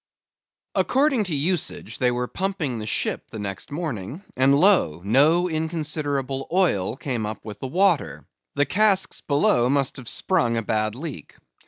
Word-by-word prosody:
According 265 -4 +2
to 170 -5 -2
usage 165 +4 -2
they 125 -2 +3
were 125 0 -2
pumping 180 - -2
the 105 - -6
ship - - -1
next 100 -2 -5
morning; 145 - -5
and 135 +2 +4
lo! 175 - +4
no 150 - +4
inconsiderable 150 -5 -2
oil 145 - +1
came 120 -7 -2
up 110 0 -7
with 105 -2 -8
the 130 - -4
water; 180 +2 +1 0.3
the 145 - +2
casks 195 +4 +2
below 125 -4 +2
must 140 -1 0
have 125 -3 -7
sprung 120 -12 +1
a 115 - -1
bad 110 0 -1
leak. 145 +2 -8
140 Hz, 150 wpm, -23 LUFS, 120-175 Hz, 0.3 s, and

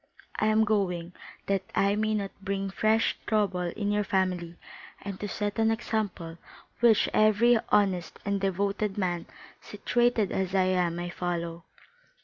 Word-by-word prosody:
"I 215 - +2
am 215 0 +4
going, 180 -5 -1 0.3
that 195 -1 +1
I 200 +1 +3
may 215 0 0
not 200 -2 -2
bring 195 0 -2
fresh 220 +3 +2
trouble 205 -4 +1
into 200 +4 -2
your 210 0 +1
family: 180 -3 -1 0.5
and 200 -2 -6
to 205 - -3
set 205 +1 -3
an 225 0 +4
example 210 -7 -3 0.4
which 230 -3 +5
every 215 +2 +4
honest 190 -5 +1
and 200 -1 -1
devoted 200 +1 -1
man, 175 -3 -1 0.3
situated 235 0 0
as 190 0 -1
I 190 - +4
am, 180 -2 +1
may 175 0 -4
follow." 170 -1 -4
200 Hz, 145 wpm, -28 LUFS, 180-215 Hz, 0.5 s, which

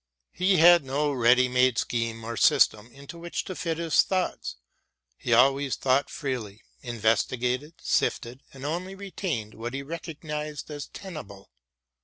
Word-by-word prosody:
He 185 +1 +2
had 175 0 +7
no 145 +2 0
ready 125 -1 +4
made 125 -1 +3
scheme 115 -2 -2
or 115 +1 -5
system 110 +1 +3
into 140 +5 -11
which 170 0 -4
to 185 - -6
fit 165 -4 -2
his 165 -2 +3
thoughts; 185 -1 -2 0.6
he 120 - -5
always 135 +3 +4
thought 135 +1 +1
freely, 120 -8 -5 0.2
investigated, 125 +5 0
sifted 125 +2 -1
and 135 0 -10
only 180 +5 -3
retained 180 - -4
what 120 +3 -6
he 140 - -4
recognised 150 -1 -6
as 145 -1 -6
tenable. 125 - -10
135 Hz, 140 wpm, -27 LUFS, 120-165 Hz, 0.6 s, had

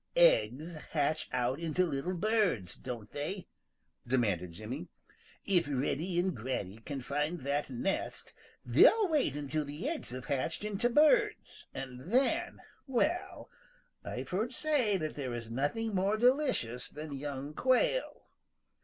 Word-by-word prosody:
"Eggs - - +4 0.2
hatch 155 0 +1
out 125 +3 0
into 170 +2 +1
little 165 +3 -2
birds, 195 - +1
don't 120 -5 -7
they?" 175 +6 -4 0.6
demanded 100 -9 +1
Jimmy. 120 - -6 0.6
"If 180 -5 +3
Reddy 145 +6 -1
and 185 -2 +1
Granny 110 -4 -4
can 135 +4 -5
find 150 +5 -2
that 140 +2 -1
nest, 135 +10 -2 0.3
they'll 440 -3 +6
wait 290 - +2
until 150 +1 -1
the 150 - -5
eggs 320 0 -2
have 125 0 -6
hatched 140 +7 -1
into 210 +3 0
birds 305 - +3
and 130 +5 -7
then, 320 +8 +2 0.3
well, 330 +9 -1 0.5
I've - - -5
heard 220 +7 -1
say 255 -10 +2
that 155 -3 -3
there 130 -4 -4
is 115 -1 -6
nothing 175 - -1
more 195 +3 +2
delicious 245 - +2
than 150 0 -7
young 140 +1 -5
Quail. 260 - +1
155 Hz, 135 wpm, -32 LUFS, 130-220 Hz, 0.6 s, they'll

